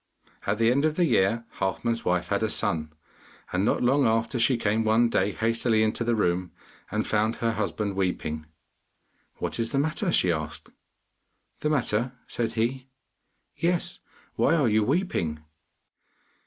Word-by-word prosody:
At 100 +1 +1
the 115 +1 +4
end 140 +3 +2
of 155 -1 +1
the 175 - +3
year 115 -3 +2
Halfman's 115 +4 -1
wife 90 0 0
had 100 +1 +1
a 110 - +1
son, 80 -5 0 0.6
and 90 +1 +1
not 110 - +1
long 135 +2 +4
after 115 +2 0
she 120 +2 +3
came 110 0 +1
one 110 +2 +3
day 100 -2 +1
hastily 115 +1 +1
into 110 +2 0
the 120 0 +1
room, 90 -3 0 0.4
and 105 +1 -1
found 110 +1 +1
her 115 -1 0
husband 105 -2 -2
weeping. 80 -5 -2 0.9
'What - - -3
is 115 0 -1
the - - 0
matter?' 160 +6 0
she 90 - +3
asked. 80 -1 -4 0.9
'The 150 - 0
matter?' 125 -4 0
said 115 -2 -2
he. 125 +3 -1 0.7
'Yes, 175 0 -1 0.3
why 165 - +3
are 145 -6 +3
you 110 0 +3
weeping? 105 - -1
110 Hz, 155 wpm, -26 LUFS, 100-125 Hz, 0.9 s, the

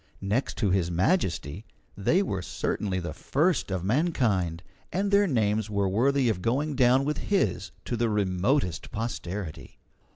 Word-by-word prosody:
Next 105 +7 -1
to 105 -5 +1
His 90 -3 +1
Majesty, 90 - 0 0.3
they 170 - +2
were 95 - -2
certainly 95 +3 -2
the 85 -3 -5
first 155 - 0
of 95 -2 -2
mankind, 105 - +1 0.3
and 195 +2 0
their 200 0 +5
names 110 - +1
were 100 -2 0
worthy 130 +7 +2
of 105 -6 0
going 140 +8 0
down 130 +1 +4
with 150 +1 -1
his 190 - +1 0.2
to 120 - -2
the 115 0 +1
remotest 100 - 0
posterity. 100 -6 -5
105 Hz, 150 wpm, -27 LUFS, 95-140 Hz, 0.3 s, their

